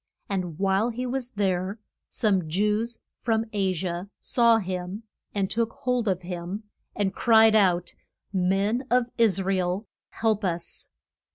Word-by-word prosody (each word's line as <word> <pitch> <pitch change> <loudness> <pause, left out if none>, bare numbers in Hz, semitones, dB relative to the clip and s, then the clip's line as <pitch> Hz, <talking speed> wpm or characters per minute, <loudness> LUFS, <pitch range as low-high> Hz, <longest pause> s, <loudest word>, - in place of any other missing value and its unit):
And 180 -5 -3
while 195 +4 +2
he 245 +2 -3
was 250 0 -2
there 190 -1 0 0.3
some 190 -7 +1
Jews 210 +6 0 0.2
from 225 -1 +1
A 195 -2 +1
si 185 +1 -3
a 175 +2 -3
saw 235 -2 +4
him 185 +1 -4 0.3
and 195 -1 +1
took 230 +3 -1
hold 250 -3 -1
of 185 -2 0
him, 180 +4 -5 0.3
and 195 -2 0
cried 225 -2 +5
out, 180 -4 +3 0.4
Men 195 +6 +1
of 245 0 +2
Is 200 -4 +4
ra 195 +1 +1
el, 180 +3 -1 0.2
help 220 -2 0
us. 170 -2 -3
200 Hz, 150 wpm, -26 LUFS, 185-225 Hz, 0.4 s, cried